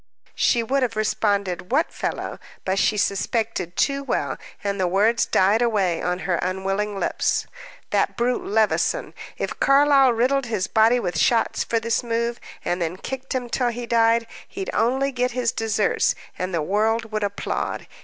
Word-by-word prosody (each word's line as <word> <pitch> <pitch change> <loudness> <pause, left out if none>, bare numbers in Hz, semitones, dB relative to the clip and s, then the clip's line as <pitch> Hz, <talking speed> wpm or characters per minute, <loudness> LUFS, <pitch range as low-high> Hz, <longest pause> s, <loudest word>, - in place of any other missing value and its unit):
She 235 -2 +2
would 270 +4 0
have 245 -3 0
responded, 200 -4 -1
what 310 +6 +2
fellow? - - -4 0.3
But 190 +1 0
she 210 - +2
suspected 200 -3 -1
too 275 0 +1
well, - - -2 0.2
and 200 -1 -2
the 185 - +2
words 210 +6 +2
died 200 +5 +3
away 200 -8 +1
on 180 0 -1
her 175 -2 +1
unwilling 195 +2 -2
lips. - - 0 0.5
"That - - +1
brute, 245 +1 0
Levison. 215 +1 +1 0.2
If - - -4
Carlyle 275 -1 +5
riddled 255 +3 +1
his 210 -5 -1
body 225 +4 +4
with 175 -7 -2
shots 235 -2 +2
for 230 - 0
this 230 0 0
move, 235 0 -2 0.3
and 175 +1 -1
then 170 +2 -2
kicked 265 +5 -5
him 250 -1 -2
till 245 +1 0
he 240 +1 -5
died, 230 0 +3 0.2
he'd 390 -1 -5
only 265 +4 +1
get 250 -1 -1
his 245 -2 0
deserts, 220 -2 +1 0.2
and 185 +1 -3
the 165 -3 -1
world 220 +5 0
would 215 -1 -1
applaud. 200 0 -3
225 Hz, 165 wpm, -23 LUFS, 195-245 Hz, 0.5 s, Carlyle